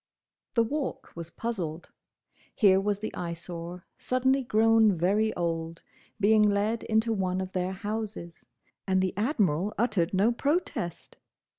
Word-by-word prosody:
The 230 Hz, -, +5 dB
Walk 285 Hz, +4 st, -4 dB
was 170 Hz, 0 st, -7 dB
puzzled. 175 Hz, -7 st, -4 dB, 0.6 s
Here 195 Hz, -4 st, +5 dB
was 205 Hz, 0 st, 0 dB
the 215 Hz, +2 st, -5 dB
Eyesore, 170 Hz, 0 st, -6 dB
suddenly 260 Hz, +2 st, +1 dB
grown 225 Hz, -3 st, +4 dB
very 205 Hz, +6 st, +2 dB
old, 165 Hz, -1 st, -3 dB, 0.4 s
being 215 Hz, +1 st, +5 dB
led 210 Hz, +2 st, +2 dB
into 220 Hz, +1 st, +1 dB
one 185 Hz, -3 st, -1 dB
of 190 Hz, 0 st, -5 dB
their 185 Hz, 0 st, -1 dB
houses, 205 Hz, -4 st, -5 dB, 0.4 s
and 190 Hz, -1 st, +3 dB
the 185 Hz, -1 st, 0 dB
Admiral 205 Hz, -, 0 dB
uttered 210 Hz, -7 st, +1 dB
no 200 Hz, +5 st, +3 dB
protest! 280 Hz, -, -2 dB
200 Hz, 130 wpm, -28 LUFS, 175-225 Hz, 0.6 s, The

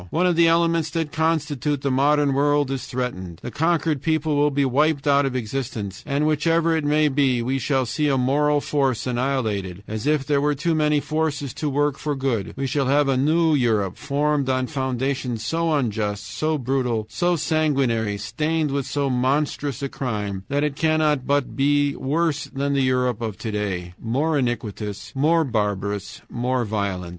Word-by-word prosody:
One 175 Hz, -, +1 dB
of 180 Hz, -1 st, +3 dB
the 170 Hz, 0 st, +5 dB
elements 165 Hz, -1 st, +2 dB
that 160 Hz, -2 st, -2 dB
constitute 150 Hz, -3 st, -1 dB
the 140 Hz, -, +1 dB
modern 145 Hz, +1 st, +3 dB
world 145 Hz, 0 st, +2 dB
is 135 Hz, -3 st, -4 dB
threatened, 95 Hz, -9 st, -4 dB
the 120 Hz, -, -5 dB
conquered 160 Hz, +1 st, +1 dB
people 155 Hz, -1 st, 0 dB
will 145 Hz, +1 st, +3 dB
be 140 Hz, -1 st, +1 dB
wiped 145 Hz, +2 st, +1 dB
out 140 Hz, -1 st, +4 dB
of 130 Hz, -, -4 dB
existence, 110 Hz, -5 st, -4 dB
and 145 Hz, +1 st, 0 dB
whichever 165 Hz, +2 st, +2 dB
it 160 Hz, -, -1 dB
may 150 Hz, +1 st, +3 dB
be, 135 Hz, -4 st, +1 dB
we 130 Hz, +3 st, -1 dB
shall 135 Hz, -1 st, +1 dB
see 150 Hz, +6 st, -1 dB
a 135 Hz, -2 st, +2 dB
moral 145 Hz, +3 st, +2 dB
force 135 Hz, -6 st, 0 dB
annihilated, 115 Hz, -8 st, -2 dB
as 110 Hz, +5 st, -4 dB
if 150 Hz, -2 st, +2 dB
there 145 Hz, -1 st, +1 dB
were 150 Hz, 0 st, +1 dB
too 165 Hz, +4 st, 0 dB
many 150 Hz, -1 st, +2 dB
forces 150 Hz, -3 st, -2 dB
to 150 Hz, +1 st, -2 dB
work 145 Hz, 0 st, 0 dB
for 150 Hz, -1 st, -2 dB
good 130 Hz, -7 st, -2 dB
we 135 Hz, -, -2 dB
shall 135 Hz, 0 st, 0 dB
have 145 Hz, +1 st, +3 dB
a 135 Hz, -, +2 dB
new 160 Hz, +4 st, +3 dB
Europe 110 Hz, -9 st, +1 dB
formed 145 Hz, -1 st, 0 dB
on 130 Hz, 0 st, +1 dB
foundations 130 Hz, -3 st, -2 dB
so 165 Hz, +5 st, 0 dB
unjust, 105 Hz, -7 st, -1 dB
so 155 Hz, +5 st, -1 dB
brutal, 125 Hz, -4 st, -1 dB
so 175 Hz, +11 st, 0 dB
sanguinary, 135 Hz, -10 st, +1 dB
stained 150 Hz, +8 st, -1 dB
with 140 Hz, -1 st, -2 dB
so 145 Hz, -1 st, -1 dB
monstrous 140 Hz, +2 st, 0 dB
a 140 Hz, -, -2 dB
crime, 105 Hz, -8 st, -4 dB
that 145 Hz, +1 st, 0 dB
it 150 Hz, -2 st, -1 dB
cannot 155 Hz, -4 st, +1 dB
but 140 Hz, -2 st, 0 dB
be 145 Hz, +1 st, +2 dB
worse 150 Hz, +1 st, 0 dB
than 140 Hz, +1 st, -2 dB
the 140 Hz, -, +2 dB
Europe 125 Hz, -3 st, +1 dB
of 110 Hz, -3 st, -4 dB
to 110 Hz, -, -4 dB
day 95 Hz, -4 st, -3 dB
more 140 Hz, +8 st, 0 dB
iniquitous, 110 Hz, -6 st, -3 dB
more 160 Hz, +5 st, +3 dB
barbarous, 105 Hz, -5 st, -2 dB
more 125 Hz, 0 st, -1 dB
violent. 100 Hz, -4 st, -2 dB
140 Hz, 180 wpm, -23 LUFS, 120-150 Hz, -, the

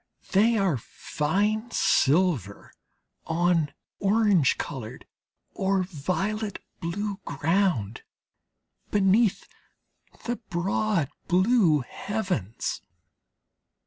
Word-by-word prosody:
They 220 Hz, +4 st, +4 dB
are 190 Hz, -8 st, +2 dB
fine 205 Hz, -, -1 dB
silver 145 Hz, -, +1 dB, 0.5 s
on 165 Hz, -2 st, +1 dB, 0.3 s
orange 200 Hz, -7 st, +3 dB
coloured 125 Hz, -6 st, -6 dB, 0.5 s
or 190 Hz, -1 st, +1 dB
violet 195 Hz, +5 st, -2 dB, 0.2 s
blue 200 Hz, +4 st, -3 dB
ground, 160 Hz, -, 0 dB, 0.9 s
beneath 205 Hz, +1 st, +2 dB, 0.8 s
the 240 Hz, 0 st, -1 dB
broad 190 Hz, -, -1 dB, 0.2 s
blue 185 Hz, -, +4 dB
heavens. 180 Hz, -, -3 dB
185 Hz, 70 wpm, -26 LUFS, 155-210 Hz, 0.9 s, They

